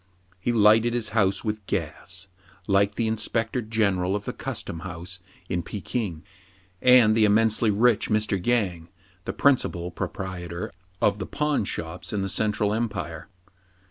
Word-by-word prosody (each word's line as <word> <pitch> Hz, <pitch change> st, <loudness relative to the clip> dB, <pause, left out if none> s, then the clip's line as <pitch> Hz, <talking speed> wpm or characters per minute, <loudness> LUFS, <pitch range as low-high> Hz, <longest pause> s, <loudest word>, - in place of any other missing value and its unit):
He 120 Hz, -, 0 dB
lighted 115 Hz, +1 st, +5 dB
his 115 Hz, -3 st, 0 dB
house 100 Hz, -3 st, +1 dB
with 105 Hz, -1 st, -3 dB
gas, 95 Hz, 0 st, -3 dB, 0.4 s
like 100 Hz, 0 st, +2 dB
the 115 Hz, -, 0 dB
inspector 115 Hz, +2 st, -1 dB
general 100 Hz, -4 st, +1 dB
of 100 Hz, -1 st, -4 dB
the -, -, -3 dB
custom 80 Hz, -, -5 dB
house 90 Hz, 0 st, -6 dB, 0.3 s
in 90 Hz, -2 st, -1 dB
Pekin, 95 Hz, -2 st, -4 dB, 0.6 s
and 125 Hz, -4 st, +7 dB
the 115 Hz, -, +4 dB
immensely 110 Hz, +1 st, +4 dB
rich 110 Hz, +1 st, +3 dB
Mr. 105 Hz, -4 st, 0 dB
Yang, 90 Hz, -9 st, 0 dB, 0.4 s
the -, -, -3 dB
principal 90 Hz, -11 st, +2 dB
proprietor 90 Hz, 0 st, -5 dB, 0.3 s
of 105 Hz, 0 st, +3 dB
the 95 Hz, -, -4 dB
pawn 150 Hz, -7 st, 0 dB
shops 85 Hz, +1 st, -4 dB
in 100 Hz, -2 st, 0 dB
the 95 Hz, -, -2 dB
Central 105 Hz, +1 st, 0 dB
Empire. 95 Hz, -8 st, -3 dB
105 Hz, 140 wpm, -25 LUFS, 90-110 Hz, 0.6 s, and